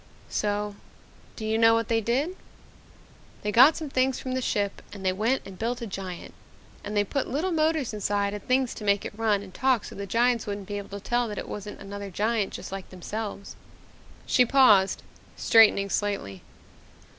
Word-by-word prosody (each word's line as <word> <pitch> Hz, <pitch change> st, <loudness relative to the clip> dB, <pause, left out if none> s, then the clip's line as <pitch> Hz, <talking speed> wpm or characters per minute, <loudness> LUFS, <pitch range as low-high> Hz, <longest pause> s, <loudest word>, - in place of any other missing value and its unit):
"So 210 Hz, 0 st, -1 dB, 0.6 s
do 220 Hz, -, -6 dB
you 220 Hz, +1 st, 0 dB
know 225 Hz, 0 st, +6 dB
what 230 Hz, -1 st, 0 dB
they 225 Hz, -1 st, +1 dB
did? 265 Hz, -, 0 dB, 1.1 s
They 210 Hz, -, -1 dB
got 260 Hz, +8 st, +7 dB
some 315 Hz, -, -4 dB
things 260 Hz, 0 st, +1 dB
from 255 Hz, -, -5 dB
the 260 Hz, 0 st, -1 dB
ship 205 Hz, -4 st, -1 dB
and 195 Hz, -2 st, -9 dB
they 185 Hz, -, +2 dB
went 225 Hz, +7 st, 0 dB
and 190 Hz, -2 st, -11 dB
built 235 Hz, +2 st, -1 dB
a 235 Hz, -, -5 dB
giant. 190 Hz, -4 st, -7 dB, 0.5 s
And 205 Hz, +1 st, -4 dB
they 205 Hz, -, +4 dB
put 265 Hz, +7 st, -2 dB
little 320 Hz, +8 st, -1 dB
motors 315 Hz, -6 st, +1 dB
inside 205 Hz, -1 st, -1 dB
and 210 Hz, -, -5 dB
things 255 Hz, -1 st, +2 dB
to -, -, -9 dB
make 200 Hz, -1 st, +2 dB
it -, -, -5 dB
run 215 Hz, -2 st, +1 dB
and 190 Hz, -2 st, -12 dB
talk 260 Hz, -2 st, +1 dB
so -, -, -9 dB
that -, -, -7 dB
the 200 Hz, -, -5 dB
giants 235 Hz, +1 st, +2 dB
wouldn't 200 Hz, -1 st, -5 dB
be 205 Hz, -1 st, -3 dB
able 200 Hz, 0 st, -7 dB
to -, -, -14 dB
tell 240 Hz, 0 st, +1 dB
that 210 Hz, -2 st, -6 dB
it -, -, -5 dB
wasn't 205 Hz, 0 st, -7 dB
another 200 Hz, 0 st, -7 dB
giant 210 Hz, +2 st, 0 dB
just -, -, -7 dB
like 195 Hz, -1 st, -6 dB
themselves." 200 Hz, +2 st, -6 dB, 0.7 s
She 250 Hz, -, +4 dB
paused, 230 Hz, -7 st, +4 dB, 0.3 s
straightening 210 Hz, -4 st, +5 dB
slightly. 195 Hz, -, -2 dB
210 Hz, 195 wpm, -26 LUFS, 200-245 Hz, 1.1 s, got